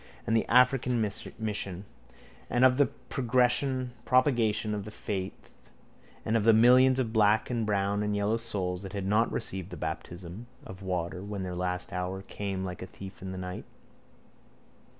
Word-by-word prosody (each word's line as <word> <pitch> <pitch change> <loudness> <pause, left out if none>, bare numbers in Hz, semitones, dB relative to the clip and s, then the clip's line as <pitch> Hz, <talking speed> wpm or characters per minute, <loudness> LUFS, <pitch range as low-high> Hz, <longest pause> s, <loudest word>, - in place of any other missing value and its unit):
and 115 - +1
the 115 - +2
African 125 0 +4 0.4
mission 100 -3 -4 0.6
and 125 +2 +4
of 130 -1 +5
the 145 - +5
propagation 125 -2 +1
of 105 -1 -3
the 105 - -7
faith 95 -3 -6 0.6
and 110 - +1
of 115 - +2
the 115 +1 +6
millions 125 +3 +6
of 120 -4 -1
black 110 +1 +3
and 115 -3 -1
brown 100 0 +1
and 105 0 0
yellow 105 +2 +1
souls 95 -6 -3
that 95 -1 -8
had 100 -2 -3
not 105 +3 +2
received 95 -1 -4
the 90 - -8
baptism 90 +8 -6 0.2
of 95 +1 -10
water 90 -1 -3
when 100 -1 -4
their 90 -1 -4
last 90 0 -2
hour 90 +1 -3
came 95 -1 -4
like 90 -1 -6
a 95 - -6
thief 95 0 -11
in 95 0 -5
the 95 - -6
night. 90 0 -6
105 Hz, 165 wpm, -29 LUFS, 95-120 Hz, 0.6 s, the